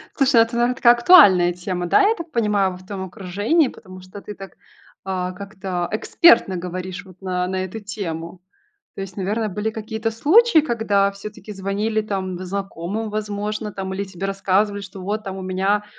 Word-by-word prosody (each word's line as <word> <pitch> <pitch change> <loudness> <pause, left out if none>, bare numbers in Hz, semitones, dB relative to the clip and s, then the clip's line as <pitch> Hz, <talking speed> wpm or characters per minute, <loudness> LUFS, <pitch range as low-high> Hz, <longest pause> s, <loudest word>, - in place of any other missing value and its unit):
Слушай, 275 -2 +2
ну 230 - +8
это, 230 +1 -6
наверно, 240 +1 +1
такая 240 -1 +6
актуальная 200 - +6
тема, 180 0 -4
да, - - +4
я 445 - +2
так 335 -6 -8
понимаю, 210 -5 +1
в 185 +1 -14
твоем 190 -1 -5
окружении, 205 - 0
потому 185 -5 -11
что 185 +2 -11
ты 210 - -8
так, 195 -1 -11 0.5
а, 185 -1 -3
как-то 190 -2 -5
экспертно 215 - +4
говоришь 185 +2 -6
вот 185 0 -17
на 180 -1 -2
на 185 0 -2
эту 190 +4 -7
тему. 180 -4 -6 0.5
То - - -6
есть, 195 -1 -7
наверно, 210 +4 -1
были 210 +3 -2
какие-то 220 +1 -4
случаи, 335 - +5
когда 215 -7 +1
всё-таки 210 +1 -9
звонили 205 +3 -1
там 190 -4 -4
знакомым, 195 +2 -4
возможно, 210 0 -3
там 190 -1 -5
или 200 - -2
тебе 190 0 -6
рассказывали, 195 +1 0
что 190 0 -10
вот 210 +3 -3
там 195 -1 -6
у - - -6
меня, 190 +3 0
200 Hz, 180 wpm, -21 LUFS, 185-215 Hz, 0.5 s, ну